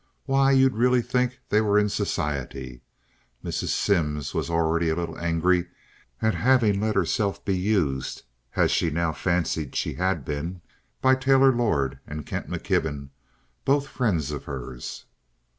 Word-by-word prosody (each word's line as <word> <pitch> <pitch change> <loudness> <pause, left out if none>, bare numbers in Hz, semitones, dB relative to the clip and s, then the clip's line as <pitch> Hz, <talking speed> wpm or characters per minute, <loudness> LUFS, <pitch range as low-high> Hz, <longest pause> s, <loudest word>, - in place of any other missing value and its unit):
Why, 135 0 +3
you'd 135 -1 +5
really 125 +2 +3
think 125 0 0
they 105 - +4
were 105 -1 +2
in 105 0 +4
society." 70 - -3 0.6
Mrs. - - -2
Simms 75 -8 0
was - - -2
already 85 0 +1
a 80 - +1
little 85 -1 -3
angry 85 +1 +1 0.6
at 110 0 +3
having 115 -5 +3
let 110 0 0
herself 100 -5 0
be 95 - +1
used, 90 -9 -1 0.3
as - - +3
she 85 - +2
now 85 +1 0
fancied 85 -4 -1
she - - -1
had 90 -5 -1
been, 80 +6 -4 0.4
by 130 0 +5
Taylor 135 0 +5
Lord 70 - 0
and 75 0 -6
Kent - - -5
McKibben, 70 -3 -2 0.5
both 140 +1 +2
friends 95 - -1
of - - -6
hers. 65 -2 -7
90 Hz, 145 wpm, -25 LUFS, 75-120 Hz, 0.6 s, you'd